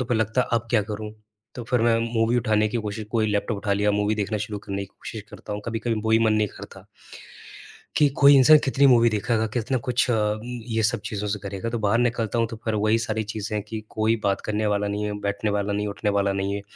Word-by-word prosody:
तो 125 - -2
फिर 120 - 0
लगता 110 +3 +1
है, - - 0
अब 120 0 +1
क्या 115 -3 +3
करूँ? 105 +1 -6 0.4
तो 120 - -6
फिर 125 -3 +3
मैं 115 -1 +3 0.2
मूवी 115 +2 +2
उठाने 110 -2 +2
की 115 - -3
कोशिश 105 +1 -4
कोई 110 -2 +1
लैपटॉप 105 +1 -1
उठा 100 0 -1
लिया, 105 +1 +2
मूवी 105 +1 +1
देखना 105 0 -2
शुरू 105 -1 -5
करने 100 0 -5
की 100 - -7
कोशिश 110 +2 -9
करता - - -8
हूँ, 105 - -4
कभी-कभी 115 0 -2
वो 110 - -1
भी 110 - +5
मन 110 -1 +3
नहीं 105 -1 +1
करता। - - -12 1.1
कि 150 - +5
कोई 140 0 +8
इंसान 150 +4 +8
कितनी 140 +1 +3
मूवी 120 -2 +6
देखेगा, 110 +1 0
कितना 125 +2 0
कुछ 125 +1 +1
अ, - - +3
उम, 105 +1 -1 0.2
ये 110 -1 0
सब 115 +1 +1
चीज़ों 105 -4 -3
से 105 - -2
करेगा। 100 +2 -5
तो 120 - -2
बाहर 105 +2 +1
निकलता 120 -2 0
हूँ 115 - +2
तो 115 - -6
फिर 110 -1 -1
वही 110 +2 +2
सारी 110 -1 -2
चीज़ें 105 0 -4
हैं 105 - -2
कि 110 -1 -4
कोई 110 +1 +1
बात 100 -1 +1
करने 105 0 -1
वाला 105 0 0
नहीं 105 +1 -2
है, 105 - -2
बैठने 100 +1 -2
वाला 100 0 -1
नहीं, 105 +1 -1
उठने 105 +1 -2
वाला 100 -1 +1
नहीं 95 +1 -2
है। 100 - -4
110 Hz, 255 wpm, -24 LUFS, 105-115 Hz, 1.1 s, कोई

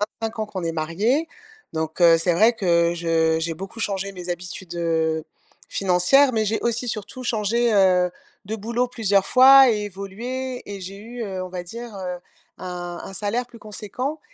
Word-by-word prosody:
25 225 +2 -4
ans 215 - -1
qu'on 200 -3 -6
est 165 - 0
mariés. 200 - 0 0.4
Donc 160 +1 -4
heu, 165 -1 +8
c'est 170 +1 +1
vrai 220 +7 +5
que 170 -4 +2
je 165 -1 +1
j'ai 165 0 -2
beaucoup 195 +6 -8
changé 200 -2 -2
mes 180 -2 -9
habitudes, 175 0 -6
heu, 160 -2 0 0.4
financières, 195 +9 +3
mais 220 -2 +1
j'ai 220 +2 0
aussi 235 +1 -1
surtout 225 +4 -5
changé, 230 +1 +1
heu, 185 -2 +4 0.4
de 215 - -3
boulot 235 +4 -1
plusieurs 205 -5 +1
fois 265 0 +8
et 210 -2 -1
évolué 235 +7 -5
et 200 - -7
j'ai 190 +2 -7
eu, 235 +3 -8
heu, 190 -3 -4
on - - -7
va 180 -1 -5
dire, 230 +4 -8
heu, 180 -2 -4 0.4
un 175 -1 -6
un - - -8
salaire 215 +6 -2
plus 240 -1 -15
conséquent 215 +8 -5
200 Hz, 180 wpm, -23 LUFS, 175-230 Hz, 0.4 s, heu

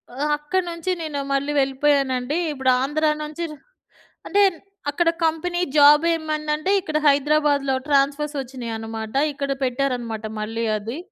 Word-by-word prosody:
ఆహ్, 290 +3 -1
అక్కడ 295 +6 -1
నుంచి 335 +2 -3
నేను 305 -3 -3
మళ్ళీ 280 +1 0
వెళ్ళిపోయానండి. 270 0 +1
ఇప్పుడు 265 -3 0
ఆంధ్ర 295 +3 0 0.2
నుంచి 300 +3 -5
ర - - -7 0.7
అంటే 405 - +3
న్ - - -15 0.3
అక్కడ 330 +3 +2 0.2
కంపెనీ 345 +2 -1
జాబేమైందంటే, 305 +2 +3
ఇక్కడ 310 -3 -2
హైదరాబాద్‌లో 285 -1 +2
ట్రాన్స్‌ఫర్సొచ్చినాయనమాట. 265 -6 -2 0.2
ఇక్కడ 280 0 -3
పెట్టారనమాట 245 -4 -2
మళ్ళీ 225 +2 -3
అది. 225 +6 -6
285 Hz, 120 wpm, -22 LUFS, 260-305 Hz, 0.7 s, అంటే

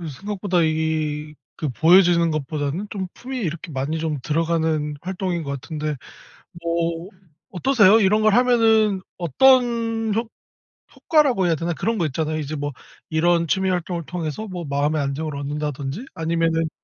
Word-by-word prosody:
이 170 - -5
생각보다 190 +3 -1
이게 155 -1 -1 0.5
보여지는 170 0 +5
것보다는 155 +5 -3
좀 190 -3 -4
품이 260 +1 -7
이렇게 170 -4 -4
많이 140 +5 -2
좀 155 -3 -2
들어가는 160 -1 0
활동인 180 -1 -3
것 140 - -5
같은데 155 -1 -4 0.7
뭐 170 +1 -1 0.4
어떠세요? 220 0 +4
이런 210 +2 +3
걸 215 -1 +4
하면은 225 -5 +4 0.2
어떤 230 - +3
효 225 +1 -1 0.7
효과라고 275 - +2
해야 165 - +2
되나? 170 +2 -2
그런 220 +7 -1
거 170 - +1
있잖아요. 155 +2 -2
이제 155 0 -4
뭐 145 0 -3 0.4
이런 170 +1 +2
취미 190 +4 +1
활동을 175 -2 -2
통해서 180 +5 -4
뭐 180 -2 -6
마음의 145 +2 0
안정을 140 +2 -3
얻는다든지 145 - -4
아니면은 165 -1 0
170 Hz, 330 characters per minute, -22 LUFS, 155-200 Hz, 0.7 s, 보여지는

